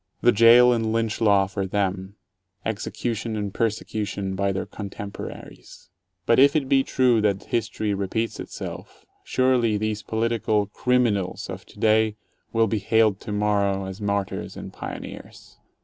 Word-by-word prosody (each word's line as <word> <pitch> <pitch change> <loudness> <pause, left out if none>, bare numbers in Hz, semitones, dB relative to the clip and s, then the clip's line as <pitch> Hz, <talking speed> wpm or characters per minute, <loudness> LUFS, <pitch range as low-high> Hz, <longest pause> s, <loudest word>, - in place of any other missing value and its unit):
The 120 - +5
jail 120 +3 +7
and 115 -2 0
lynch 115 -1 -1
law 100 -3 +4
for 95 0 -3
them; 95 0 -2 0.5
execution 110 +1 -3
and 105 -2 -3
persecution 105 -3 -2
by 100 +1 0
their 95 - -3
contemporaries. 100 -1 -9 0.3
But 115 - +4
if 140 +2 +6
it 145 -4 +1
be 135 0 +4
true 125 -5 +2
that 100 -2 +1
history 110 -2 -2
repeats 100 +4 -2
itself, - - -8 0.2
surely 125 -4 +2
these 110 0 -2
political 110 -2 0
"crim 125 +4 +1
inals" 100 -5 -2
of - - -9
today 110 -1 +2 0.4
will 115 0 +3
be 110 0 -1
hailed 110 0 +2
tomorrow 100 -2 0
as 95 +2 -7
martyrs 100 -1 -2
and - - -8
pioneers. - - -9
110 Hz, 140 wpm, -24 LUFS, 100-115 Hz, 0.5 s, jail